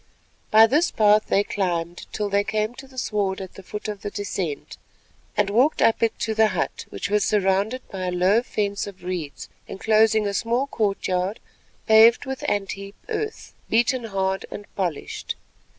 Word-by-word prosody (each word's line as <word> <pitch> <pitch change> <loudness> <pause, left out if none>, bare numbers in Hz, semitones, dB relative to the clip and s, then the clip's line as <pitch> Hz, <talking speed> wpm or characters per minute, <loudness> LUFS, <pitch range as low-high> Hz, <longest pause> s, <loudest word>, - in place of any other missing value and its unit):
By 220 +1 +8
this 300 +9 +2
path 210 0 +4
they 200 - +3
climbed 175 -4 -2
till 210 -1 -2
they 200 0 +2
came 215 +2 -1
to 270 +2 -11
the 260 -1 -18
sward 205 -5 -1
at 190 -2 -8
the - - -11
foot 210 +3 -7
of 205 -2 -5
the 205 - -4
descent, 195 -7 -4 0.6
and 205 -1 +2
walked 255 +9 +3
up 225 - +3
it 230 -1 +1
to 225 -1 0
the 220 0 +4
hut - - -3
which - - -5
was 210 -1 +3
surrounded 205 +5 +1
by 185 -2 -4
a - - -1
low 185 +5 +3
fence 205 -5 -2
of 190 -3 -11
reeds, 175 -5 -5 0.2
enclosing 220 +1 +3
a 200 - -1
small 235 +5 0
court 210 -7 -1
yard 185 +3 -1 0.5
paved 225 +3 +6
with 265 -1 -5
ant 200 -1 -1
heap 195 +1 -8
earth 435 0 -4 0.2
beaten 240 +2 +2
hard 190 -2 -2
and 205 - -8
polished. 175 -6 -3
205 Hz, 180 wpm, -24 LUFS, 195-225 Hz, 0.6 s, By